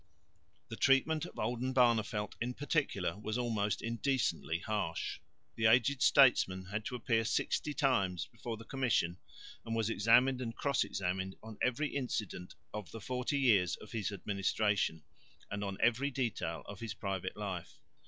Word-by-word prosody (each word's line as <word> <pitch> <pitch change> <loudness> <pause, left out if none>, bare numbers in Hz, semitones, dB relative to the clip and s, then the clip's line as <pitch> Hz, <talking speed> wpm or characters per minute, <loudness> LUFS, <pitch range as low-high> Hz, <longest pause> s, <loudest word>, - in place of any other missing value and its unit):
The 115 - -5
treatment 145 +6 +3
of - - -13
Oldenbarneveldt 120 -3 +1
in 125 +1 -2
particular 105 - -1
was 110 +2 -3
almost 110 -4 -1
indecently 115 - 0
harsh. 105 -3 -2 0.3
The 110 -1 +2
aged 125 +3 +4
statesman 95 -9 +5
had 105 +3 -4
to 125 - -3
appear 115 -2 +1
sixty 145 +6 0
times 95 - +1
before 115 -2 -7
the 115 - -11
commission 115 -10 0 0.4
and 115 0 -3
was 115 0 0
examined 125 +5 +4
and 115 -2 -4
cross 140 -3 +1
examined 95 +1 -2
on 110 -1 -10
every 140 +4 +1
incident 110 -9 -3 0.2
of 105 -3 -5
the 115 - -8
forty 125 +5 -2
years 100 - +4
of 105 - -13
his 110 -4 -2
administration 100 -3 0 0.5
and 100 +1 -3
on 100 -1 -3
every 125 +4 +2
detail 110 - -2
of 100 -2 -9
his 110 -4 -5
private 95 -2 -3
life. 95 -5 -5
110 Hz, 150 wpm, -34 LUFS, 100-125 Hz, 0.5 s, statesman